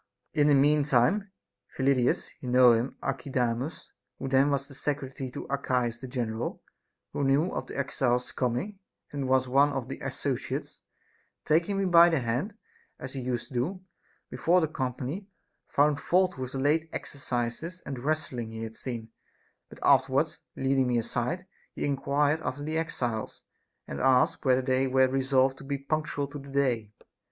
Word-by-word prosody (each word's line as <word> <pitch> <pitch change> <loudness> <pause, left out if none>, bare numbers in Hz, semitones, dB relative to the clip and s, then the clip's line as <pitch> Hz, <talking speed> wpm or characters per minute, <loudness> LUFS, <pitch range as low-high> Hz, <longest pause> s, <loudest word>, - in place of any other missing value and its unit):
In 145 -1 +3
the 145 - +6
mean 145 +2 +4
time 150 - +2 0.5
Phyllidas 130 -2 +2
(you 125 - -5
know 125 0 +7
him, 115 +3 0
Archidamus) 130 +1 -2 0.3
who - - -6
was 135 - -4
then 140 +1 +4 0.2
secretary 135 -1 -3
to - - -7
Archias 125 -4 0
the 130 - -7
general, 120 -3 -3 0.5
who 145 - -1
knew 140 +6 +3
of - - -4
the - - -7
exiles 125 -2 0
coming 130 - -2 0.3
and 140 -2 -3
was 130 0 +3
one 140 +3 +4
of 135 -2 -4
the - - -5
associates, - - -3 0.6
taking 170 +6 +2
me 195 - +1
by 170 -1 +7
the 165 - +2
hand, 130 - -2 0.4
as 130 - -7
he 135 - -4
used 125 -1 -3
to - - -13
do, 170 +11 -1 0.5
before 175 +2 +3
the 160 - +1
company, 135 +6 -4 0.4
found 145 0 +3
fault 185 +1 +2
with 130 -1 -5
the 135 - -2
late 155 +4 +2
exercises 135 +6 -4
and 135 -2 -5
wrestling 135 -5 -2
he 110 0 -6
had 110 0 -6
seen; 115 -3 -6 0.6
but - - -12
afterwards - - +3 0.2
leading 135 -1 +2
me 120 -1 +2
aside, 125 +10 -2 0.3
he - - -3
enquired 145 +2 +1
after 145 -1 -4
the 155 +2 -3
exiles, 125 -9 -3 0.4
and 70 - -5
asked 125 - +3
whether 130 0 +4
they 130 +1 +2
were 130 0 +4
resolved 135 0 +2
to - - -10
be 140 +1 -2
punctual 145 0 -2
to 145 +1 -8
the 140 0 -11
day. 125 -6 0
135 Hz, 165 wpm, -28 LUFS, 125-150 Hz, 0.6 s, know